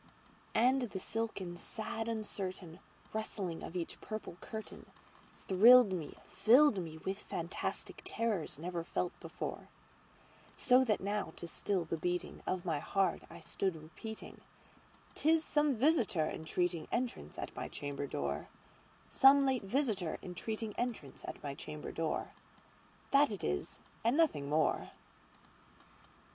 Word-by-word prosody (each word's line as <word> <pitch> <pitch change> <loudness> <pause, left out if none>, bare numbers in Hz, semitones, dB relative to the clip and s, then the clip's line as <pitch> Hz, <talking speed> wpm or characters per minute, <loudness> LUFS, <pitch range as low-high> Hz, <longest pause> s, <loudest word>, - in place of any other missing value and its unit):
And 255 +4 +4
the 230 -5 -3
silken 190 -5 -3
sad 225 +2 -4
uncertain 190 -6 -4 0.3
rustling 200 -6 -2
of 170 - -7
each 170 -2 -4
purple 215 -5 -6
curtainThrilled 220 +1 +3
me—filled 205 - +3
me 160 -2 -7
with 190 +5 -3
fantastic 170 +2 -4
terrors 215 -11 -1
never 170 +2 -3
felt 175 +1 -1
before; - - -6 0.9
So 255 +1 +5
that 215 -5 +1
now, 200 -4 -2
to 170 - -7
still 185 +1 0
the 160 0 -3
beating 180 +2 -2
of 185 -1 -1
my 160 -4 0
heart, 195 +5 +1
I - - -11
stood 190 -3 -1
repeating"'T 215 - -7
is 325 0 +5
some 295 -3 +2
visitor 235 - +3
entreating 165 +1 -1
entrance 245 0 -2
at - - -5
my - - -4
chamber 145 -1 -4
door, 70 - -2 0.6
Some 275 +1 +7
late 260 -6 +1
visitor 205 - 0
entreating 215 +4 -4
entrance 230 - -3
at - - -7
my 140 -1 -3
chamber 150 +2 -7
door:This 275 - -2
it 205 -4 -5
is 75 0 -2 0.2
and 235 +5 +3
nothing 150 - +2
more." 155 +1 +2
195 Hz, 125 wpm, -34 LUFS, 165-230 Hz, 0.9 s, Some